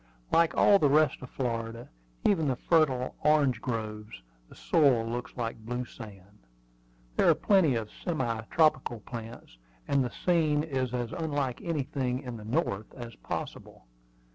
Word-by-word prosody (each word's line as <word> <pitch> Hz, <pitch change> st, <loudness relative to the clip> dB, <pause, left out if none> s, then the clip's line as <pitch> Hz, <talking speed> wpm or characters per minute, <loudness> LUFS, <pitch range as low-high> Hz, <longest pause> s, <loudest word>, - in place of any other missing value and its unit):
Like 165 Hz, 0 st, +3 dB
all 200 Hz, -1 st, +6 dB
the 145 Hz, -, +3 dB
rest 150 Hz, 0 st, +3 dB
of 125 Hz, -, -9 dB
Florida, 115 Hz, -2 st, -4 dB, 0.4 s
even 165 Hz, -7 st, +3 dB
the 130 Hz, -, +1 dB
fertile 130 Hz, -4 st, +2 dB
orange 145 Hz, -6 st, +3 dB
groves, 105 Hz, -, -5 dB, 0.3 s
the -, -, -15 dB
soil 135 Hz, -8 st, +3 dB
looks 120 Hz, +3 st, -5 dB
like 115 Hz, -1 st, -3 dB
blue 120 Hz, +2 st, -3 dB
sand. 100 Hz, -4 st, -13 dB, 0.8 s
There -, -, +5 dB
are -, -, +6 dB
plenty 185 Hz, -10 st, +3 dB
of 110 Hz, -2 st, -3 dB
semi 120 Hz, -10 st, -2 dB
tropical 135 Hz, -8 st, +2 dB
plants, 115 Hz, -, -9 dB, 0.3 s
and 140 Hz, -1 st, +2 dB
the 125 Hz, -, -2 dB
scene 155 Hz, -1 st, +1 dB
is 130 Hz, -5 st, -2 dB
as 120 Hz, -2 st, -3 dB
unlike 145 Hz, -7 st, -2 dB
anything 135 Hz, -5 st, -2 dB
in 125 Hz, -2 st, -6 dB
the 105 Hz, -2 st, -9 dB
North 110 Hz, -, -1 dB
as 120 Hz, -2 st, -8 dB
possible. -, -, -7 dB
125 Hz, 150 wpm, -29 LUFS, 115-150 Hz, 0.8 s, all